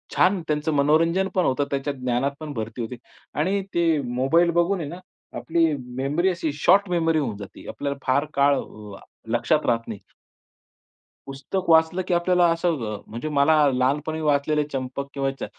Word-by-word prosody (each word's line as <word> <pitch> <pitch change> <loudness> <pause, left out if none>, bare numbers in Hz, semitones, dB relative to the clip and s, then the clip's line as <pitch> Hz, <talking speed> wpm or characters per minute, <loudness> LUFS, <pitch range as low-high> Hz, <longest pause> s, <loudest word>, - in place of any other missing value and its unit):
छान 185 0 +3
त्यांचं 150 +1 -1
मनोरंजन 165 +6 +2
पण 185 - +2
होतं. 135 +2 +1
त्याच्या 140 +1 -1
ज्ञानात 130 +1 -1
पण 155 -2 -6
भरती 115 0 -5
होते. 120 +2 -5 0.4
आणि 195 +5 +1
ते 170 -1 +2 0.3
मोबाईल 165 +8 +3
बघून 185 +3 +1
आहे 150 -4 -4
ना, 175 +3 -8 0.4
आपली 165 0 +1 0.3
मेमरी 150 +8 +1
अशी 170 -4 -2
शॉर्ट 185 +7 +3
मेमरी 165 -2 +1
होऊन 115 -8 -3
जाते. 100 -2 -11
आपल्याला 140 -1 -4
फार 140 +3 +3
अ, - - -9
काळ 140 0 +3 0.7
लक्षात 155 +5 +1
राहत 115 -1 0
नाही. 105 -3 -6 1.3
पुस्तक 140 +8 -4
वाचलं 160 +3 +4
की - - +1
आपल्याला 175 0 +3
असं 170 +1 0 0.3
अ, - - -6
म्हणजे 120 +8 -5
मला 140 +3 +5 0.2
लहानपणी 145 +5 0
वाचलेले 150 0 +1
चंपक 135 +1 -4
किंवा 135 -1 -1
चा - - -3
150 Hz, 165 wpm, -24 LUFS, 135-170 Hz, 1.3 s, मला